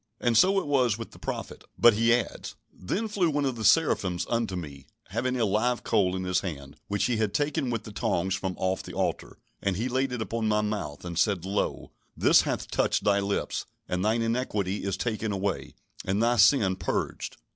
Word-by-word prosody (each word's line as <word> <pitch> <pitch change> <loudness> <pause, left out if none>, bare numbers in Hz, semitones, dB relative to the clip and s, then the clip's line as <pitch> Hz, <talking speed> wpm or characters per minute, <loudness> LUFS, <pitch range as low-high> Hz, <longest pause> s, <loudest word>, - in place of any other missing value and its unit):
And 120 -1 +1
so 190 - +5
it - - -5
was 130 -7 +2
with 115 - -7
the - - -15
prophet. - - -5
But 120 -1 +7
he 115 +2 +3
adds: 120 -2 -1 0.2
"Then 195 - -3
flew 200 -5 +1
one 145 -1 0
of 130 -2 -1
the 110 - -5
seraphims 95 - +3
unto 115 -5 0
me, 70 -6 -7 0.2
having 125 +4 -1
a 115 - +3
live 110 +5 +1
coal 95 -4 +2
in 95 - -3
his 90 0 +1
hand, 70 -7 -6
which 100 0 -1
he 120 -2 +1
had 105 -2 -1
taken 145 -2 0
with 115 -2 -2
the 110 - -9
tongs 95 -2 -1
from 95 -1 -2
off 95 0 -1
the - - -10
altar. - - -2 0.2
And 100 -2 0
he 115 +5 -1
laid 130 +1 0
it 125 - -3
upon 110 0 -2
my 105 0 +2
mouth, 100 -9 -4
and 85 -1 -3
said, 95 -5 +1
Lo, 100 +1 -2 0.3
this - - +6
hath - - -3
touched - - +1
thy 100 -1 +3
lips; 100 0 -2 0.2
and 90 0 -1
thine 110 +2 +2
iniquity 105 -5 -1
is 95 -1 -1
taken 110 0 -2
away, 100 0 -3 0.3
and 100 +4 0
thy 120 +1 +3
sin 100 -4 +5
purged." - - -3
105 Hz, 210 wpm, -27 LUFS, 95-120 Hz, 0.3 s, But